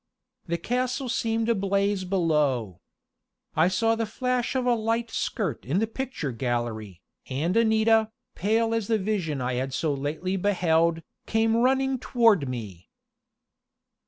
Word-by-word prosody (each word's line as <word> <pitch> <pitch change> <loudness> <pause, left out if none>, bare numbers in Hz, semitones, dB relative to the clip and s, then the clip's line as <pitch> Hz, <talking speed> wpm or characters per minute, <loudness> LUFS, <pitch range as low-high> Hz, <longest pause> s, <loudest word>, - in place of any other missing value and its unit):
The 170 0 -1
castle 255 - -2
seemed 225 -1 0
ablaze 200 -2 +1
below. 150 - 0 0.7
I 160 +2 +4
saw 225 +5 +2
the 225 -1 -1
flash 250 +3 -1
of 255 -1 0
a 245 - +4
light 230 0 -1
skirt 180 - -2
in 140 +9 -1
the 220 - +2
picture 225 - -4
gallery, 115 -6 -3 0.3
and 150 +7 -1
Anita, 220 -1 +3 0.2
pale 225 +4 +1
as 225 -3 -1
the 225 - +2
vision 185 -9 -2
I 125 0 -1
had 135 0 -3
so 155 -3 0
lately 155 +7 -2
beheld, 170 -4 +2 0.2
came 225 0 +2
running 265 +2 +2
toward 225 - +3
me. 105 -8 -7
200 Hz, 135 wpm, -26 LUFS, 150-225 Hz, 0.7 s, I